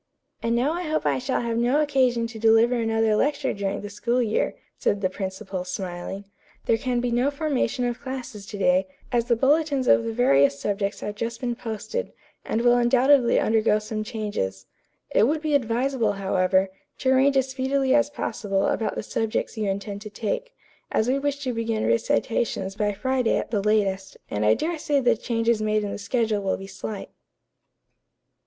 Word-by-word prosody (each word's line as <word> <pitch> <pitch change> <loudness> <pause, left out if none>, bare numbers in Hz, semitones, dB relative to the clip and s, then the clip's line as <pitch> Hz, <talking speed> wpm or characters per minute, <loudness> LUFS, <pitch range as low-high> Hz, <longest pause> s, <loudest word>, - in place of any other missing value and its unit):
"And 230 0 0
now 260 +6 +1
I 350 - -3
hope 310 -2 -1
I - - +2
shall 260 +1 -1
have 230 -1 -2
no 245 +5 +2
occasion 260 -5 +2
to 230 -1 -7
deliver 225 +2 +5
another 225 -2 +1
lecture 280 +3 +1
during 200 0 -3
the 205 - -6
school 235 +4 0
year," 220 -3 0 0.2
said 205 - 0
the 185 -2 0
principal, 190 -1 -5
smiling. 185 +1 -5 0.4
"There 225 - +2
can 245 0 0
be 245 0 -1
no 245 +4 +2
formation 280 -5 -1
of 240 -1 -2
classes 260 -6 -6
to 205 - -7
day, 185 -1 +3 0.2
as 240 -2 +1
the 240 -1 +2
bulletins 280 +1 +2
of - - +5
the 230 - -2
various 140 - +3
subjects 200 0 -2
have 205 - -4
just 230 +2 -4
been 245 -2 -1
posted, 230 - -5 0.3
and 230 - -1
will 245 0 +5
undoubtedly 250 +1 +4
undergo 215 -1 +3
some 215 0 -4
changes. 210 - -4 0.5
It 220 - +4
would 310 +3 +1
be 305 -1 -2
advisable, 245 -3 +1
however, 190 -1 +1 0.3
to 260 - +1
arrange 270 +1 +4
as 265 0 +2
speedily 265 0 +1
as 290 0 +3
possible 195 -8 -2
about 225 - -1
the - - -3
subjects 225 +2 -2
you 215 -3 -1
intend 200 +1 -4
to 210 - -7
take, - - -4 0.4
as 220 - +1
we 270 +2 +2
wish 285 0 -2
to 255 -2 -1
begin 225 -1 -1
recitations 190 - 0
by 210 0 0
Friday 255 +3 0
at - - -4
the 210 -4 +1
latest, 195 -2 0
and 105 +1 0
I 110 - +5
dare 330 0 -2
say 290 -1 +1
the 245 -3 +3
changes 230 0 0
made 215 0 +1
in 205 - -3
the - - -5
schedule 220 -1 0
will 195 -1 -1
be 195 - -8
slight." 200 +1 -7
230 Hz, 190 wpm, -25 LUFS, 205-260 Hz, 0.5 s, deliver